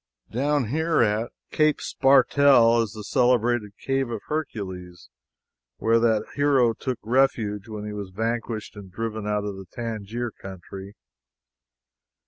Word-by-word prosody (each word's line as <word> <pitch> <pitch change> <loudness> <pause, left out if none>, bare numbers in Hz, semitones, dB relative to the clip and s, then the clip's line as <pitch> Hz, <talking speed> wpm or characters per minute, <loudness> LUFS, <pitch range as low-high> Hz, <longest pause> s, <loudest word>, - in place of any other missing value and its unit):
Down 140 0 0
here 160 +1 +2
at 110 +2 0 0.2
Cape 155 -1 +2
Spartel 135 -3 +4
is 110 -3 -3
the 110 -2 -8
celebrated 120 -1 +1
cave 135 -2 -1
of 115 -3 -4
Hercules, 95 - -5 0.7
where 115 +1 +3
that 110 -2 +2
hero 135 -5 +3
took 130 +1 -4
refuge 110 -4 +1
when 105 -1 -6
he 105 - -5
was 100 -2 -6
vanquished 115 +2 -3
and 100 -2 -11
driven 110 +1 -4
out 105 -1 0
of 100 -2 -5
the 95 -1 -10
Tangier 115 0 -4
country. 95 +1 -10
115 Hz, 130 wpm, -25 LUFS, 105-125 Hz, 0.7 s, Spartel